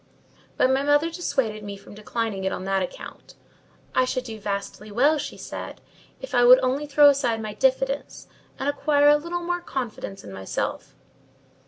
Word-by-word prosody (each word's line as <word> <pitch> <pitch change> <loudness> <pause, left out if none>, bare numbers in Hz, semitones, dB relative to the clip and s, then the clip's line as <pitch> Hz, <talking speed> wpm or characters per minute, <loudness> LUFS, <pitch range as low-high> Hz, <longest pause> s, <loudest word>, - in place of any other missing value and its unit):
But 255 - +4
my 265 +1 +2
mother 290 +3 +2
dissuaded 265 -11 -2
me 200 -1 -6
from 200 - -14
declining 215 -1 -3
it 190 - 0
on - - -4
that 195 0 0
account: 185 - -8 0.6
I 255 - +3
should 255 0 -2
do 225 -3 -8
vastly 205 +1 -5
well, 285 +8 +3
she - - -6
said, - - -7 0.4
if - - -9
I 245 - +4
would 250 +1 +9
only 270 +4 0
throw 290 +1 +6
aside 255 -5 +1
my 215 -1 -5
diffidence, 270 +3 0 0.3
and 270 - -3
acquire 290 0 +3
a 295 - +6
little 345 +3 -4
more 350 0 -2
confidence 240 - -5
in 100 - -10
myself. 95 0 -4
255 Hz, 175 wpm, -24 LUFS, 215-290 Hz, 0.6 s, would